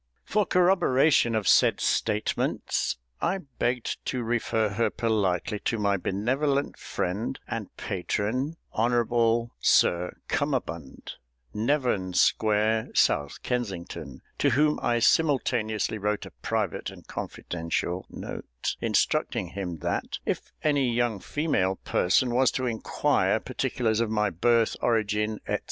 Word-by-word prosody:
For 210 -2 +1
corroboration 155 -9 +4
of 110 -3 -1
said - - +5
statements 105 - 0 0.2
I 195 - +1
begged 125 -7 -3
to 125 -2 -1
refer 115 -2 0
her 110 +2 +1
politely 105 -3 0
to 115 - +1
my 100 -1 +2
benevolent 135 +10 0
friend 100 +8 -3
and 115 -4 -4
patron, 110 - -2
Hon'ble 115 0 +2
Sir 90 +1 +3
CUMMERBUND, 80 -5 -3 0.4
Nevern 110 -5 0
Square, 110 +1 +2
South 70 -1 +2
Kensington; 105 -9 -4 0.2
to 145 - +3
whom 150 +4 +2
I 120 - +1
simultaneously 120 -6 +1
wrote 105 +1 -1
a - - -10
private - - -1
and - - -13
confidential 85 +2 -4
note, - - -5
instructing - - +1
him 90 -4 -5
that - - -2
if - - -3
any 140 -5 +2
young 120 -3 0
female 95 - 0
person 120 +8 +1
was 130 0 +4
to 130 - -1
inquire 115 -3 +1
particulars 110 -3 -1
of 115 -2 +1
my 105 -2 +1
birth, 115 +6 +2
origin, 110 -2 +1
&c. - - +1
115 Hz, 120 wpm, -27 LUFS, 105-125 Hz, 0.4 s, said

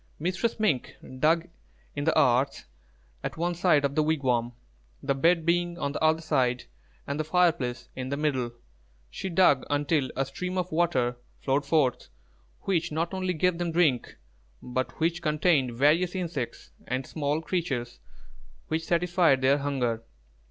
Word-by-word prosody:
Mistress 185 +8 -1
Mink 180 - 0 0.2
dug 165 +3 +3 0.5
in 145 - -2
the 160 -1 +3
earth 135 -1 +2 0.6
at - - -4
one 175 +2 0
side 170 -5 +3
of 140 - -1
the 155 - +2
wigwam, 130 -6 0 0.5
the 140 - +1
bed 165 +4 +2
being 175 0 +1
on 140 -4 -2
the - - -5
other 160 +1 +3
side, 130 -6 +1 0.4
and 140 +2 -3
the - - +1
fire 180 +2 +4
place 125 -5 -5
in 130 0 -4
the 140 - -2
middle. 135 -5 0 0.6
She 190 - -5
dug 165 -6 +4
until 145 -1 +1
a 135 - 0
stream 180 +7 -5
of 180 0 -2
water 155 -8 +1 0.2
flowed 140 +1 0
forth 140 -5 +1 0.5
which 175 -3 0
not 165 +4 -2
only 185 -1 -1
gave 175 +2 +1
them 175 -1 -1
drink, 155 -8 +1 0.4
but 125 +1 -4
which 165 +2 0
contained 150 -6 +1
various 165 +7 +3
insects 160 - -4 0.2
and 130 +1 -2
small 150 +1 -1
creatures 150 - -3 0.7
which 160 +1 -1
satisfied 175 -5 +3
their 140 +2 +4
hunger. 125 -5 -1
155 Hz, 155 wpm, -27 LUFS, 135-175 Hz, 0.7 s, fire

